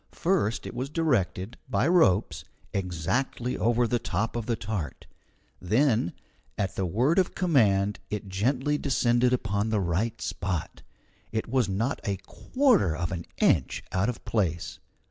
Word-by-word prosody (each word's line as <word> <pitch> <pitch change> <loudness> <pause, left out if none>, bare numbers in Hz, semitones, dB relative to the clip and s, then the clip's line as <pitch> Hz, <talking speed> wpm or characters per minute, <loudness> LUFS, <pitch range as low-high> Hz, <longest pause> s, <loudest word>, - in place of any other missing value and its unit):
First 170 - 0
it - - -6
was 130 +2 -3
directed, 120 - 0
by 130 +1 +2
ropes, 115 - +3 0.3
exactly 100 +8 -1
over 120 +2 +2
the 120 +1 0
top 115 +1 -2
of 115 -2 -3
the 120 - +1
tart; 105 -8 -5 0.6
then 110 - +2 0.4
at 95 -2 -1
the 95 - -1
word 125 - +2
of 185 - 0
command 105 - +2
it 105 -1 -4
gently 130 +9 0
descended 125 -2 +2
upon 105 -3 0
the 110 -1 +1
right 100 +6 -1
spot. 90 -4 -3 0.5
It 110 0 -2
was 125 -3 +1
not 110 +8 -1
a 100 -1 -1
quarter 245 - +2
of 85 +1 -2
an 85 -2 -4
inch - - +2
out 95 +5 +1
of 125 - -6
place. 85 -7 -1
110 Hz, 145 wpm, -27 LUFS, 95-130 Hz, 0.6 s, ropes